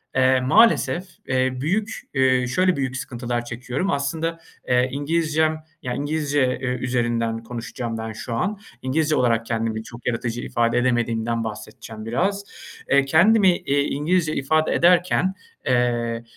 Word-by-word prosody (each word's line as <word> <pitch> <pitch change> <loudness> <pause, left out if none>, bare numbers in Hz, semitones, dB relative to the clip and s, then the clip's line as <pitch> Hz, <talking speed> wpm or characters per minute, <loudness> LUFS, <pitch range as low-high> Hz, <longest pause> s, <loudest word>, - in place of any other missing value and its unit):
eee, 130 0 +4
maalesef, 175 - +4 0.2
eee, 130 0 +1
büyük, 205 +9 -1
eee, 130 -2 +3
şöyle 185 +8 +2
büyük 135 -1 -2
sıkıntılar 120 -2 -4
çekiyorum. 125 +9 -3
Aslında, 160 +4 -2 0.3
eee, 125 +1 +3
İngilizcem, 155 +2 0 0.2
yani, 125 -1 -3
İngilizce 145 -3 0
ü 130 - -2 0.2
üzerinden 115 -2 -1
konuşacağım 115 0 -5
ben 110 0 -5
şu 115 +2 -6
an. 195 - -1 0.2
İngilizce 155 +4 +1
olarak 115 -2 +2
kendimi 115 -1 -2
çok 120 +1 -11
yaratıcı 120 0 -2
ifade 115 -1 0
edemediğimden 115 -2 0
bahsedeceğim 110 0 -8
biraz. 190 - 0 0.5
Eee, 140 0 +4
kendimi 185 +5 +5
iii, 140 +1 0
İngilizce 155 +2 0
ifade 155 +3 +1
ederken, 180 +2 +3 0.3
eee, 120 -2 0
130 Hz, 130 wpm, -23 LUFS, 120-155 Hz, 0.5 s, kendimi